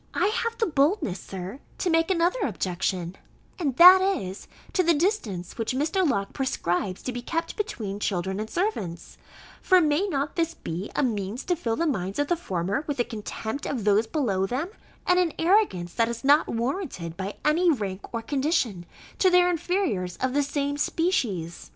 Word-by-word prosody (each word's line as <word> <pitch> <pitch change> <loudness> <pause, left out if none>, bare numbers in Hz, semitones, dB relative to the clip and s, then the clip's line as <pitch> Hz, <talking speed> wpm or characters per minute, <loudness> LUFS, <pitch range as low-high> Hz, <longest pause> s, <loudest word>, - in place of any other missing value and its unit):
I 370 +4 +2
have 460 +1 -2
the 450 - +2
boldness, 295 - +1
Sir, 190 +6 -7 0.2
to 365 - -1
make 330 +1 +3
another 355 +5 +2
objection; 185 - -2 0.4
and 285 -8 -1
that 365 +4 +10
is, 200 - -2 0.3
to 370 - +3
the 340 -2 +3
distance 245 - -1
which 225 +3 -1
Mr. 320 +8 +1
Locke 200 -6 -1
prescribes 185 -7 -2
to 255 - -3
be 245 0 -5
kept 330 +7 -3
between 220 - -4
children 190 -1 -1
and 215 +1 -4
servants: 210 - -3 0.4
for 370 -2 +5
may 315 +4 +2
not 290 -1 -2
this 335 0 0
be 175 +5 -5
a - - +2
means 215 -1 -2
to 355 - 0
fill 230 -9 -2
the 335 - 0
minds 195 - -2
of 290 0 0
the 350 - +3
former 195 - -2
with 290 -4 -3
a - - +4
contempt 220 +3 -5
of 250 -7 -2
those 210 +2 +3
below 200 -11 0
them, 275 - -2 0.4
and 360 0 +4
an 350 -3 +1
arrogance 325 - +2
that 230 -1 +1
is 235 -1 -5
not 290 +3 +5
warranted 235 - -3
by 195 +2 -5
any 340 +4 +4
rank 200 -8 -4
or 230 -1 -3
condition, 265 - 0 0.3
to 375 - +5
their 360 0 +5
inferiors 330 - -1
of 260 0 -1
the 290 - +3
same 285 0 -1
species? 215 - -1
265 Hz, 180 wpm, -26 LUFS, -, 0.4 s, that